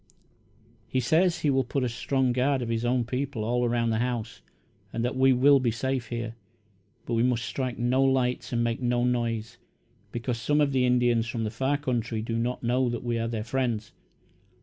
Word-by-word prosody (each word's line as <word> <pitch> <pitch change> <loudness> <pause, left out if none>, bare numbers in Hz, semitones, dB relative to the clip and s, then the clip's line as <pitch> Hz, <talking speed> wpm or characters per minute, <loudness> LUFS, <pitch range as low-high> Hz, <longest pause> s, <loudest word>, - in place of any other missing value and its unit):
"He 130 - 0
says 165 +8 +2
he 145 - +2
will 135 0 +2
put 135 0 -2
a - - +1
strong 130 +2 0
guard 130 +1 +1
of 115 - -4
his 115 0 -1
own 120 0 +1
people 130 -1 -3
all 120 +2 0
around 120 -1 +1
the 110 - 0
house 120 -2 -3 0.5
and 115 +1 -2
that 125 - -2
we 130 +1 +5
will 135 +2 +5
be 125 -2 +1
safe 130 +2 -2
here, 115 -1 -4 0.7
but 120 - -3
we 115 - +2
must 120 -1 +1
strike 130 -3 -3
no 120 +2 +2
lights 130 -2 +1
and 120 -1 +1
make 115 +1 -1
no 120 -1 +1
noise, 120 -2 -1 0.5
because 120 +1 -3
some 150 +6 +2
of 145 -2 +3
the 130 -2 +2
Indians 120 -2 +2
from 115 -2 -3
the 105 - -2
far 135 +5 0
country 120 -5 -2
do 115 0 -3
not 125 +2 -2
know 125 +1 +2
that 120 0 -4
we 120 -1 -1
are 115 - -1
their 115 -2 -3
friends. 120 -3 -2
120 Hz, 205 wpm, -27 LUFS, 115-130 Hz, 0.7 s, we